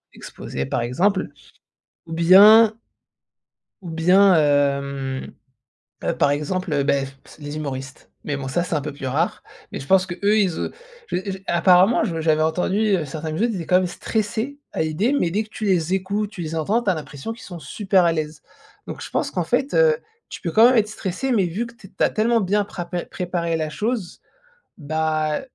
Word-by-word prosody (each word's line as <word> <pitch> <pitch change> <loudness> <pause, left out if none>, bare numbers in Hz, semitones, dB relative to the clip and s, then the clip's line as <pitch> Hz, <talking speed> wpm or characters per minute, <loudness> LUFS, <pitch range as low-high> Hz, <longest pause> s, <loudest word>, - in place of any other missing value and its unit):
exposé, 70 - -6
par - - -1
exemple. 185 - 0 0.8
Ou 165 - -8
bien 205 +6 +7 1.1
ou 175 - -8
bien, 180 +4 +4
hem, 140 -3 0 0.7
heu, - - +1
par 145 - +3
exemple, 150 0 -1
beh, 140 -1 +1 0.3
les 145 0 -7
humoristes. 135 -3 -6
Mais 145 - -2
bon, 135 -1 -6
ça 135 +6 0
c'est 170 -1 -3
un 150 - 0
peu 150 +1 -5
plus 140 -1 -7
rare. 150 +7 -1 0.3
Mais - - -5
je 135 - -9
pense 190 +3 +4
qu'eux, 175 -1 -7 0.2
ils 210 - +4
et - - -3 0.4
j 180 - -2
j - - -5
et - - -23
apparemment, 180 +6 +4
je 165 -7 -2
j'avais 155 -1 +2
entendu, 180 +5 0 0.2
heu, 165 - -2
certains 155 +3 -5
humoristes 225 +10 0
qui 200 - -4
étaient 165 - -5
quand 180 - +4
même 185 - 0
stressés 220 +8 -3
à - - -1
l'idée. 160 - 0
Mais, 170 - 0
dès 210 +5 -1
que - - -19
tu 215 - -7
les 180 -3 +1
écoutes, 200 +2 -2
tu 180 - -7
les 160 0 -5
entends, 200 +9 0
tu 205 - +1
as - - +2
l'impression 145 +4 -7
qu'ils 225 - -13
sont 175 -3 -9
super 185 +5 +1
à 170 - +3
l'aise. 155 -1 -4 0.4
Donc - - -7
je - - -7
pense - - -1
qu'en 180 - -2
fait, 250 - 0
heu, 485 -1 +5 0.3
tu - - -8
peux 170 - -2
quand 225 +5 +7
même 255 - +3
être 215 -2 +3
stressé, 215 +5 -3
mais 200 -6 +2
vu 195 +8 -3
que 230 - -12
t 210 -4 -15
tu 190 - 0
as - - +2
tellement 230 +2 +2
bien 205 +2 +1
prapé 175 -2 -5
préparé 170 -2 -2
la 155 -1 -2
chose, 210 - -3 0.6
bah, 155 0 -1
175 Hz, 205 wpm, -22 LUFS, 155-205 Hz, 1.1 s, bien